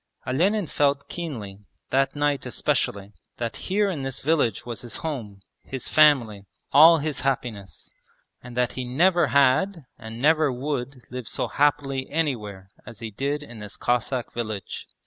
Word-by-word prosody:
Olenin 185 +10 +1
felt 140 -2 +1
keenly, 115 - -6 0.3
that 135 +2 +2
night 145 -1 0
especially, 100 +1 -1 0.2
that 115 -1 -3
here 205 +2 +2
in 175 -8 -3
this 135 -1 -4
village 140 -8 +1
was 120 -2 -5
his 120 - -6
home, 110 -11 -5 0.2
his 130 -2 -5
family, 120 -10 +4 0.2
all 165 +3 +8
his 150 -3 -2
happiness, 120 -7 -3 0.5
and 125 -1 -10
that 125 -1 +2
he 130 - -4
never 170 +9 +3
had 140 +5 +3
and 110 +1 -8
never 155 +1 +4
would 130 -1 -4
live 125 -2 -6
so - - -2
happily 135 -2 +1
anywhere 105 -12 -2 0.2
as 115 -3 -11
he 115 -1 -6
did 140 +7 -2
in 120 -5 -11
this 105 -1 -9
Cossack 125 +1 -1
village. 110 -5 -5
130 Hz, 150 wpm, -25 LUFS, 115-150 Hz, 0.5 s, all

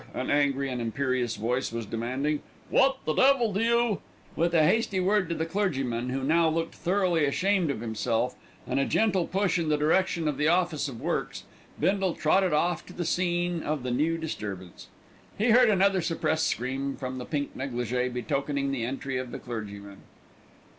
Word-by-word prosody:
an 130 - -2
angry 140 -1 +2
and 125 -2 -3
imperious 125 0 -1
voice 125 +4 -1
was 115 -1 -4
demanding. 130 +7 -2 0.3
"What 270 0 +4
the 155 - +1
devil 255 - +4
do 195 - 0
you 235 -2 +2 0.2
" - - -27
With 170 +1 +1
a 160 - +5
hasty 215 0 +2
word 190 -1 +2
to 170 - -1
the 160 - -1
clergyman, 135 - -1
who 130 +1 -2
now 160 +3 +3
looked 165 +1 -2
thoroughly 180 -3 +1
ashamed 185 +4 +1
of 130 -6 -2
himself, 115 +2 -1 0.3
and - - -1
a 135 - +2
gentle 195 -6 +1
push 190 -1 +1
in 160 -2 -1
the 150 - +3
direction 165 +2 +1
of 145 -3 -1
the 150 +1 +2
Office 175 -3 +1
of 125 -5 -7
Works, - - -3 0.4
Bindle 195 -2 +1
trotted 185 +4 +2
off 170 +2 +1
to 180 - -11
the 175 - -3
scene 175 0 0
of 150 -4 -2
the 125 - -2
new 155 +6 +1
disturbance. 100 - -6 0.5
He 225 +3 +3
heard 245 0 +6
another 195 -2 +3
suppressed 160 -1 0
scream 135 +3 -2
from 130 -1 -5
the 125 - -6
pink 145 -3 -3
négligé 125 -1 -2
betokening 140 +3 -1
the 130 -4 -2
entry 135 +2 -3
of 130 -1 -4
the - - -6
clergyman. 100 -4 -7
150 Hz, 185 wpm, -27 LUFS, 125-180 Hz, 0.5 s, heard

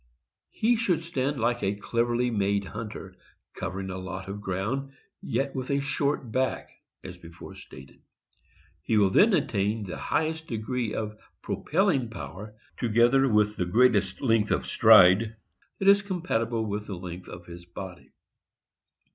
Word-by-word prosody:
He 235 +2 +1
should 190 -8 +1
stand 145 -4 -2
like 120 +2 0
a 95 +1 0
cleverly 120 +3 0
made 100 -2 0
hunter, 100 -3 -8 0.4
covering 95 +1 -5
a 95 - -5
lot 95 +1 -6
of 100 +1 -6
ground, 110 +9 -3 0.3
yet 135 0 -2
with 130 -1 -4
a 140 0 +1
short 140 -3 -1
back, 130 +2 -1 0.3
as 90 - -9
before 85 -1 -11
stated. 65 +1 -13 0.8
He 110 - 0
will 100 -2 +4
then 215 - +5
attain 110 - 0
the 95 - -6
highest 160 0 -2
degree 115 0 -3
of 105 0 -4 0.2
propelling 155 - 0
power 105 -1 -8 0.2
together 120 +3 +3
with 105 -1 +2
the 90 - 0
greatest 100 -2 +2
length 115 -4 +2
of - - 0
stride 110 -1 +6 0.4
that 195 - -2
is 200 0 +7
compatible 120 - -2
with 105 0 -4
the 100 - -5
length 90 0 -8
of 85 0 -10
his 85 0 -11
body. 90 +1 -9
110 Hz, 145 wpm, -27 LUFS, 95-135 Hz, 0.8 s, is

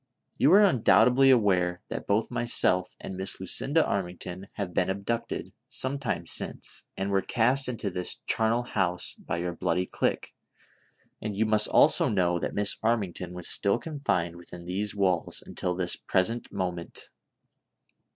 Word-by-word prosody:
You 140 - +5
are 205 +2 +7
undoubtedly 135 - +4
aware 95 -7 +2
that - - -6
both 105 +2 0
myself 90 -6 +1
and 95 - -7
Miss 95 0 0
Lucinda 140 - +2
Armington 90 -1 -4
have 100 -4 -5
been - - +1
abducted, 115 +5 -3 0.2
some 135 +2 -1
time 125 -6 -3
since, - - -2 0.2
and 95 +1 -2
were 95 -1 +2
cast 125 +6 +1
into 110 -5 -4
this 90 0 -3
charnel 115 +2 +2
house 90 -7 -1
by - - -5
your 85 0 -3
bloody 85 +2 -1
clique; - - -2 0.9
and 105 -2 -4
you 110 - +2
must 110 -1 +3
also - - +4
know 90 -3 +1
that - - -4
Miss 105 +2 +2
Armington 100 -6 -1
was 90 -1 -1
still 100 +2 +3
confined 120 - -2
within 85 0 -11
these 100 +4 -3
walls 95 -4 0
until 90 0 -3
this 90 -1 -1
present 110 +6 -1
moment. 90 -3 -5
100 Hz, 150 wpm, -27 LUFS, 90-115 Hz, 0.9 s, are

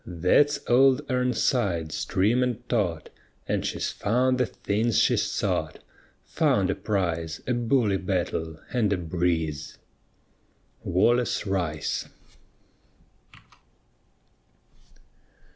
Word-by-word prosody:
_ 85 -2 -8
That's 145 +11 +4
Old 135 +3 +4
Ir'nsides, 120 - 0
trim 110 +7 +2
and 125 -1 -2
taut, 90 -9 -1 0.4
And - - -1
she's - - -2
found 125 +4 +1
the 125 - +2
things 110 +2 -1
she - - +4
sought - - -1 0.5
Found - - +1
a - - +1
prize, 85 -6 -2
a 125 - 0
bully 120 -4 +1
battle, 85 -4 -3
and 115 -5 +1
a 100 - +2
breeze! 80 -3 -2 1.1
WALLACE 120 +6 +1
RICE. 85 -6 -2
100 Hz, 95 wpm, -26 LUFS, 85-125 Hz, 1.1 s, That's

